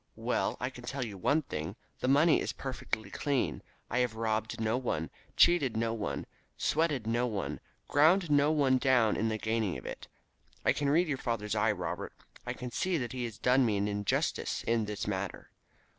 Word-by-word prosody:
Well, - - 0
I - - -2
can - - -11
tell 135 -2 -3
you 105 -3 -7
one 145 - +1
thing. 80 - -5 0.2
The - - -1
money 145 +5 +5
is - - -2
perfectly 110 -6 -4
clean. 140 +5 -1 0.3
I 120 - 0
have 125 -3 +1
robbed 110 -1 -1
no 110 +1 +1
one, 100 -11 -2 0.3
cheated 145 -10 +5
no 115 0 0
one, 110 -3 -3 0.3
sweated 150 -7 +1
no 120 +2 +1
one, 105 -5 -3 0.3
ground 160 +3 +4
no 145 +1 +5
one 135 -4 +3
down 125 -4 +3
in 110 - 0
the 110 - -1
gaining 110 -6 -1
of 65 - -11
it. - - -7 0.6
I - - +5
can 145 -1 0
read 170 +5 +3
your 140 -4 -2
father's 105 -4 -2
eye, 105 - +3
Robert. - - -4 0.3
I - - -1
can 125 -1 -7
see 185 +8 0
that 120 -5 -3
he 125 -2 -2
has 115 -3 -7
done 130 +2 +4
me 110 -4 +2
an 100 +1 0
injustice 100 -1 -1
in 115 -1 +1
this 105 -1 -4
matter. 100 -1 -4
120 Hz, 195 wpm, -31 LUFS, 110-140 Hz, 0.6 s, money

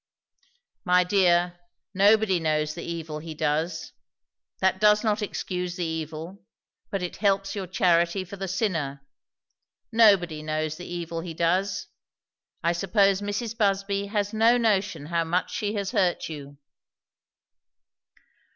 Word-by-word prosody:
'" - - -39 0.3
"My 180 0 +4
dear, 175 -2 +2 0.3
nobody 200 -1 +4
knows 155 -1 0
the 170 - -7
evil 160 -2 -5
he 160 0 -8
does. 155 +4 -1 0.7
That 190 0 +2
does 210 +1 +5
not 215 -1 +1
excuse 180 -3 -3
the 180 -2 -2
evil, 160 +4 -5 0.5
but 195 -2 -3
it 180 - -5
helps 195 -1 +1
your 195 -2 -4
charity 175 -1 +2
for 195 - -9
the 195 0 -5
sinner. 165 -9 -2 0.9
Nobody 195 -9 +4
knows 155 0 -2
the 180 - -9
evil 170 -1 -4
he 165 -1 -7
does. 180 +5 0 0.8
I 170 - +3
suppose 195 +2 +2
Mrs. 205 +2 -3
Busby 200 -2 0
has 205 0 -1
no 225 +2 +4
notion 200 -9 0
how 170 +1 0
much 175 +3 -1
she 210 0 -2
has 200 -2 -2
hurt 180 -2 +1
you." 145 -2 -9
180 Hz, 135 wpm, -26 LUFS, 165-200 Hz, 0.9 s, does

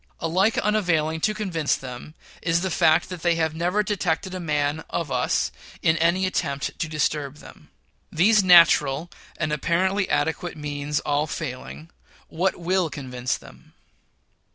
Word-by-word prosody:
Alike 185 +7 +1
unavailing 165 -7 +1
to 215 - +2
convince 180 -8 0
them 130 +4 -9 0.3
is 165 0 +1
the 190 0 -2
fact 160 0 +3
that 180 -3 -7
they 170 -1 +2
have 160 -1 0
never 180 +6 0
detected 190 -3 -1
a 185 - -4
man 150 -2 -1
of 165 -4 -3
us 125 -1 0 0.3
in 160 - +4
any 170 +3 +2
attempt 155 -7 -2
to 160 - -1
disturb 150 -2 -1
them. - - -15 0.4
These 200 +5 +4
natural 170 -3 +5 0.3
and 155 -2 -1
apparently 185 +6 0
adequate 160 +3 -1
means 145 0 -3
all 145 +1 0
failing, 155 +2 -6 0.4
what 185 +4 0
will 180 0 0
convince 125 -4 -3
them? 65 +1 -17
160 Hz, 145 wpm, -24 LUFS, 150-180 Hz, 0.4 s, natural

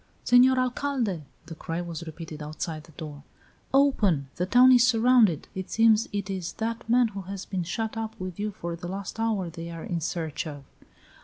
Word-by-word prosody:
"Senor 250 +1 +6
Alcalde!" 250 - -1 0.2
the 165 - -8
cry 165 +1 -4
was 170 -1 -5
repeated 160 -1 -8
outside 155 +1 -5
the 165 - -17
door, 145 -2 -8 0.5
"open! 210 - +3
The 180 - -1
town 250 +5 +7
is 245 -2 +7
surrounded! 235 - +4
It 190 0 -5
seems 225 -1 +4
it 200 -1 -3
is 185 -4 -4
that 230 +1 -4
man 240 0 +4
who 200 -2 -6
has 195 +1 -7
been 190 -2 -3
shut 220 +7 -3
up 225 -1 -5
with 185 -1 -6
you 210 +1 -1
for 170 -4 -5
the 175 +1 -7
last 195 +3 -6
hour 220 -5 0
they 165 0 -7
are 165 -1 -7
in 170 -2 -3
search 160 -1 -3
of!" 145 -2 -8
190 Hz, 190 wpm, -27 LUFS, 165-225 Hz, 0.5 s, town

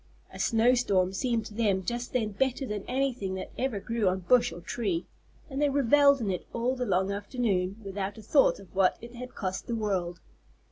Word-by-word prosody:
A - - -9
snow 230 +2 +4
storm 190 -7 +2
seemed 230 +1 0
to 215 - -9
them 200 -4 +1
just 240 +3 -3
then 225 -4 0
better 265 +5 0
than 210 -4 -4
anything 250 -8 -1
that 190 - -6
ever 255 -5 -1
grew 225 +1 -1
on 185 +1 -2
bush 240 +7 +4
or - - -8
tree, 185 -2 -2 0.4
and 275 -1 -4
they 295 - +4
revelled 280 0 +5
in 205 -4 0
it 180 - -4
all 240 +3 0
the 250 -1 -3
long 190 0 +1
afternoon 200 -2 -1
without 195 +1 -4
a 220 - -10
thought 275 +6 +4
of 195 -2 -15
what 190 -1 +3
it 235 +1 -11
had 250 +1 -9
cost 190 -2 -4
the 235 - -1
world. 185 -6 -2
220 Hz, 205 wpm, -28 LUFS, 190-250 Hz, 0.4 s, revelled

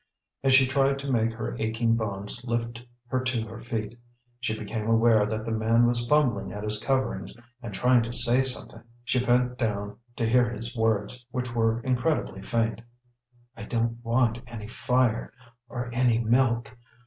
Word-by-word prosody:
As 135 -1 +5
she 130 0 +7
tried 135 +1 +2
to 140 0 -4
make 115 -2 +2
her 110 0 -4
aching 115 +1 +1
bones 105 +1 -4
lift 120 0 -3 0.3
her 130 - +1
to 120 -3 -1
her 110 +1 -9
feet, 115 -1 -5 0.4
she 110 -3 -2
became 110 +1 -4
aware 115 -2 +4
that 110 0 -3
the 115 - -3
man 110 +2 +3
was 120 0 +1
fumbling 120 -10 +2
at 105 +1 -6
his 105 0 +1
coverings 135 -1 -1 0.3
and 115 -3 -6
trying 125 +4 +3
to 115 +1 -4
say 120 +1 +2
something. 130 -3 -1 0.2
She 125 +1 +1
bent 125 0 +1
down 105 -3 -2 0.2
to 115 - 0
hear 120 0 +4
his 115 +1 -4
words, 115 +2 0
which 125 -1 -4
were 115 0 +1
incredibly 125 -4 -1
faint. 115 0 -1 0.7
"I - - -10
don't 115 0 -2
want 120 0 +1
any 110 -3 -8
fire 125 0 0 0.4
or 120 -1 -5
any 120 -2 +3
milk. 120 -1 +1
115 Hz, 170 wpm, -27 LUFS, 110-125 Hz, 0.7 s, she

